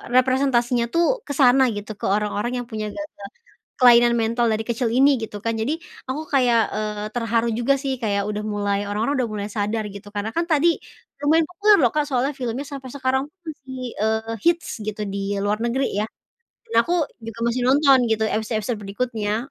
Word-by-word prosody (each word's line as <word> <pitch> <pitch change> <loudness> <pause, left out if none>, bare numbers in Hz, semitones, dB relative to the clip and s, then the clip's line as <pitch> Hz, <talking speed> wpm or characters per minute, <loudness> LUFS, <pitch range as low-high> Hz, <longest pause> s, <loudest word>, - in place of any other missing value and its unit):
representasinya 255 -2 +3
tuh 340 0 +3 0.2
ke 285 - -3
sana 265 -1 +5
gitu 205 +1 -6
ke - - -4
orang-orang 210 +3 -1
yang - - -17
punya 215 -1 -3
gangguan 305 +1 -6 0.7
kelainan 240 -1 +7
mental 235 +1 +1
dari 215 - -1
kecil 235 -1 0
ini 270 +3 +5
gitu 210 -1 -5
kan, 230 0 0
jadi 225 +7 -1 0.4
aku 290 +4 -2
kayak, 245 -4 +4 0.2
eee, 210 -1 -3
terharu 230 0 +1
juga 270 +3 +3
sih 270 -2 -2
kayak 200 -1 0
udah 210 0 -3
mulai 205 -1 -1
orang-orang 215 +7 -1
udah 225 - -5
mulai 205 0 -3
sadar 210 +1 -1
gitu, 200 +1 -11
karena 210 +4 -4
kan 335 - +2
tadi 310 +3 +4 0.6
lumayan 320 +2 +3
populer 405 +4 +4
loh 245 -4 +4
kan 300 - +3
soalnya 270 0 0
filmnya 255 +1 -3
sampai 270 -2 -7
sekarang 265 -1 0
tuh 385 - -59
masih, 260 -4 -8 0.2
eee, 220 +1 -1
hits 340 0 +2 0.2
gitu 215 0 -5
di 200 0 -2
luar 210 +1 +1
negeri 260 +3 0 0.2
ya, - - +1 0.6
dan 455 - -9
aku 350 - -3 0.3
juga 225 0 -8
masih 245 +1 0
nonton 275 -1 +6
gitu 220 0 +1
episode-episode 220 +1 -2
berikutnya. 215 +1 -2
235 Hz, 185 wpm, -22 LUFS, 215-270 Hz, 0.7 s, kelainan